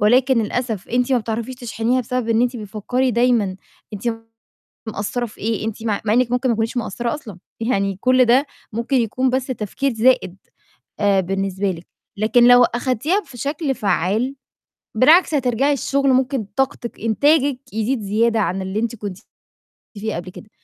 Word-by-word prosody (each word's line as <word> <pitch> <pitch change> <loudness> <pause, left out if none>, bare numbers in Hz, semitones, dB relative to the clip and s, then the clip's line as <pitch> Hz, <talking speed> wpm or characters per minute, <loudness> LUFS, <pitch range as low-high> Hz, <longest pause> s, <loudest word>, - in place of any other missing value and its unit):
ولكن 245 +3 +4
للأسف 225 -2 -3
أنتِ 250 +2 +1
ما 255 - +4
بتعرَفيش 230 +2 -4
تشحنيها 240 +1 -1
بسبب 250 -1 -3
إن 230 +1 +3
أنتِ 250 0 0
بتفكري 225 +5 -1
دايمًا 235 -5 +2 0.4
أنتِ 200 - -8 0.9
مقصرة 220 +3 -3
في 215 - -16
إيه 220 0 -2
أنتِ 220 0 -5
م - - -3
مع 210 -2 0
إنِّك 245 0 +2
ممكن 250 +1 +1
ما 235 - +2
تكونيش 225 +2 -2
مقصرة 235 +2 -2
أصلًا، 225 - -9 0.2
يعني 200 -5 0
كل 255 +1 +4
ده 260 +5 +4 0.3
ممكن 235 +5 -1
يكون 250 +2 +1
بس 260 0 -1
تفكير 255 +2 -2
زائد، 225 -5 +2 0.6
آآ، 200 -2 +3
بالنسبة 195 +1 -1
لِك، 170 0 -11 0.3
لكن 235 +3 +4
لو 245 0 +8
أخدتيها 255 - 0
في 245 - -13
شكل 285 +1 -2
فعّال 215 +6 0 0.6
بالعكس 315 +9 +5
هترجعي 265 +2 +1
الشغل 275 +1 0
ممكن 260 -3 +1
طاقتِك 255 -3 -2
إنتاجِك 280 +4 +2
يزيد 225 +2 -1
زيادة 225 +3 +1
عن 190 +1 -1
اللي 190 +3 -3
أنتِ 235 0 -2
كنتِ 200 -3 -6 0.8
فيه 215 +2 -3
قبل 175 +2 -6
كده. 215 +3 -13
235 Hz, 165 wpm, -20 LUFS, 210-255 Hz, 0.9 s, لو